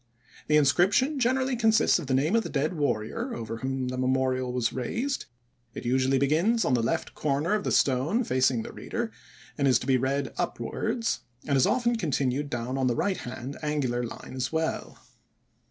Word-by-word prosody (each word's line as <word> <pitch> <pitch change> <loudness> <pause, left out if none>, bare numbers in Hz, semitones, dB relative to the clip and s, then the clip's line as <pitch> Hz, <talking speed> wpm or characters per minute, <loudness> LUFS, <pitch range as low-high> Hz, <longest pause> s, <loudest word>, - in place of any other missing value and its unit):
The 150 - +4
inscription 195 - +3
generally 260 +1 +1
contains 220 -2 +4
the 140 -7 -3
name 150 +10 +2
of 230 - +4
the - - -6
dead 150 +4 0
warrior 150 - -2
over 115 0 -5
whom 130 +1 -2
the 130 0 -4
memorial 130 0 +1
was 125 -2 0
raised; 240 - -2 0.5
it - - -7
usually 130 +2 +2
begins 165 - +2
on 125 - +2
the 120 - +3
left 165 +8 -1
corner 150 +5 0
of 210 -1 0
the - - -1
stone 140 - +2
facing 130 - +1
the - - -8
reader - - -4 0.5
and 140 - +3
is 130 -3 +5
to 120 - -6
be 130 -1 +3
read 135 +2 -1
upwards, 230 -2 -2 0.2
and - - -6
it 140 - +4
is 130 - +4
often 240 -2 +1
continued 140 - -1
down 125 +1 -3
on 130 - +2
the 120 - +1
right 190 - 0
hand 125 +2 -7
angular 145 -5 -1
line 120 - -7
as 130 -1 -2
well. 160 0 -2
140 Hz, 185 wpm, -27 LUFS, 130-185 Hz, 0.5 s, is